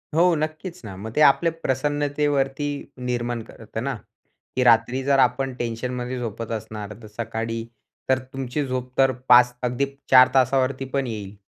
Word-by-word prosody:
हो, 170 Hz, -, +5 dB
नक्कीच 155 Hz, +4 st, -4 dB
ना. 95 Hz, -2 st, -7 dB
मग 110 Hz, +3 st, -7 dB
ते 150 Hz, -, +2 dB
आपल्या 165 Hz, +4 st, +3 dB
प्रसन्नतेवरती 145 Hz, 0 st, 0 dB, 0.4 s
निर्माण 120 Hz, -1 st, -2 dB
करतं 110 Hz, 0 st, -7 dB
ना, 140 Hz, -, -1 dB, 0.6 s
की 130 Hz, -, +2 dB
रात्री 120 Hz, +2 st, +4 dB
जर 135 Hz, 0 st, +3 dB
आपण 130 Hz, +1 st, +2 dB
टेन्शनमध्ये 125 Hz, +2 st, -3 dB
झोपत 115 Hz, -1 st, -5 dB
असणार, 110 Hz, -2 st, -5 dB
तर 110 Hz, -, -11 dB
सकाळी 115 Hz, 0 st, -3 dB, 0.5 s
तर 130 Hz, -1 st, +4 dB
तुमची 135 Hz, +2 st, -2 dB
झोप 125 Hz, -1 st, -4 dB
तर 135 Hz, -1 st, +5 dB, 0.2 s
5 125 Hz, 0 st, +7 dB
अगदी 125 Hz, +3 st, 0 dB, 0.3 s
4 130 Hz, 0 st, +9 dB
तासावरती 130 Hz, 0 st, +2 dB
पण 135 Hz, -2 st, 0 dB
येईल. 105 Hz, -3 st, -6 dB
125 Hz, 150 wpm, -23 LUFS, 115-135 Hz, 0.6 s, 4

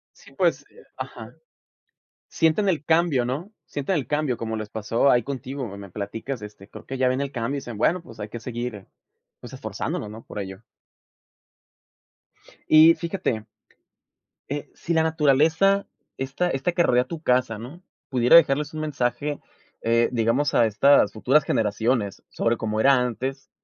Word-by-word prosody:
Sí, -, -, -18 dB
pues, -, -, +1 dB
eh 475 Hz, -, -18 dB
ajá. -, -, -8 dB, 0.9 s
Sienten 165 Hz, +5 st, +1 dB
el 165 Hz, -5 st, +1 dB
cambio, 160 Hz, -5 st, +2 dB
¿no? 150 Hz, -, -4 dB
Sienten 145 Hz, +6 st, -2 dB
el 145 Hz, -, -1 dB
cambio, 150 Hz, -5 st, 0 dB
como 110 Hz, -1 st, -3 dB
les 110 Hz, -1 st, -6 dB
pasó 115 Hz, +5 st, +1 dB
ahí 120 Hz, -2 st, +4 dB
contigo, 135 Hz, 0 st, -5 dB
me 100 Hz, -1 st, -10 dB
platicas, 110 Hz, +6 st, -5 dB
este, 105 Hz, -1 st, -11 dB
creo -, -, -12 dB
que 135 Hz, -, -5 dB
ya 130 Hz, 0 st, +2 dB
ven 130 Hz, +2 st, +1 dB
el 140 Hz, 0 st, -3 dB
cambio, 120 Hz, +2 st, -2 dB
y -, -, -2 dB
dicen: 120 Hz, -4 st, -8 dB
“Bueno, 170 Hz, -, +2 dB
pues, 115 Hz, -6 st, -14 dB
hay 105 Hz, 0 st, -5 dB
que 120 Hz, -, -7 dB
seguir, 120 Hz, -4 st, -5 dB, 0.5 s
pues, -, -, -11 dB
esforzándonos", 105 Hz, -, -4 dB
¿no?, 110 Hz, +2 st, -10 dB
por -, -, -7 dB
ello. 95 Hz, 0 st, -7 dB, 2.1 s
Y 160 Hz, +2 st, +8 dB
fíjate 170 Hz, -, -3 dB, 1.0 s
eh, 145 Hz, +1 st, -5 dB
si 170 Hz, -, -3 dB
la 160 Hz, -, +4 dB
naturaleza 160 Hz, +5 st, +3 dB, 0.3 s
esta 135 Hz, +7 st, -1 dB
esta 135 Hz, +5 st, -1 dB
que 175 Hz, 0 st, +3 dB
rodea 125 Hz, -4 st, +3 dB
tu 155 Hz, +4 st, -7 dB
casa, 125 Hz, -5 st, +1 dB
¿no?, 140 Hz, -, -10 dB, 0.3 s
pudiera 125 Hz, +2 st, +6 dB
dejarles 150 Hz, -1 st, +4 dB
un 155 Hz, -, -4 dB
mensaje, 145 Hz, -1 st, -2 dB, 0.4 s
eh, 115 Hz, +1 st, +3 dB
digamos, 120 Hz, +5 st, +1 dB
a 115 Hz, -, +5 dB
estas 110 Hz, 0 st, +4 dB
futuras 135 Hz, +7 st, +2 dB
generaciones 110 Hz, 0 st, 0 dB
sobre 115 Hz, 0 st, 0 dB
cómo 110 Hz, 0 st, -2 dB
era 135 Hz, +4 st, +6 dB
antes, 130 Hz, +2 st, -3 dB
130 Hz, 160 wpm, -24 LUFS, 115-150 Hz, 2.1 s, Y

